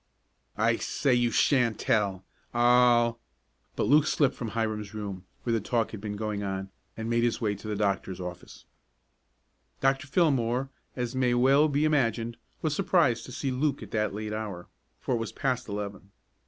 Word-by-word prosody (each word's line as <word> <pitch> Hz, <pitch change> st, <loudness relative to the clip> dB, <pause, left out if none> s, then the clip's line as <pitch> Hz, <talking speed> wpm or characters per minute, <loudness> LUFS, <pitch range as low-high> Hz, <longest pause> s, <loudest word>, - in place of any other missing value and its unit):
"I -, -, +3 dB
say 140 Hz, -3 st, 0 dB
you 120 Hz, -1 st, +3 dB
shan't 120 Hz, -2 st, +3 dB
tell. 100 Hz, -4 st, 0 dB, 0.3 s
I'll 120 Hz, -1 st, +4 dB, 0.3 s
" -, -, -43 dB
But -, -, 0 dB
Luke 150 Hz, +2 st, +5 dB
slipped 140 Hz, -3 st, +2 dB
from 120 Hz, -, -5 dB
Hiram's 110 Hz, -2 st, -2 dB
room, 100 Hz, -3 st, -5 dB, 0.2 s
where 120 Hz, -, 0 dB
the 115 Hz, -, +1 dB
talk 115 Hz, +2 st, 0 dB
had 110 Hz, -, -7 dB
been 105 Hz, -1 st, -4 dB
going 105 Hz, -1 st, -3 dB
on, 95 Hz, -1 st, -4 dB, 0.3 s
and 110 Hz, 0 st, -4 dB
made 120 Hz, 0 st, +1 dB
his 120 Hz, -, +1 dB
way 105 Hz, -3 st, 0 dB
to 100 Hz, +2 st, -9 dB
the 105 Hz, -, -2 dB
doctor's 100 Hz, -2 st, -1 dB
office. 90 Hz, -1 st, -8 dB, 1.1 s
Dr. 135 Hz, +1 st, +1 dB
Fillmore, 135 Hz, -5 st, +1 dB, 0.2 s
as 125 Hz, -1 st, -3 dB
may 125 Hz, -2 st, +2 dB
well 135 Hz, +5 st, +5 dB
be 145 Hz, +1 st, +1 dB
imagined, 120 Hz, -6 st, +1 dB, 0.3 s
was 155 Hz, -2 st, 0 dB
surprised 170 Hz, -11 st, +2 dB
to -, -, -10 dB
see 135 Hz, +2 st, -2 dB
Luke 140 Hz, +3 st, 0 dB
at -, -, -11 dB
that 105 Hz, -2 st, 0 dB
late 105 Hz, +1 st, -4 dB
hour, 105 Hz, -5 st, -5 dB, 0.3 s
for -, -, -2 dB
it 120 Hz, -, +1 dB
was 115 Hz, -, -4 dB
past 130 Hz, -5 st, -2 dB
eleven. 100 Hz, -1 st, -5 dB
115 Hz, 180 wpm, -28 LUFS, 105-130 Hz, 1.1 s, Luke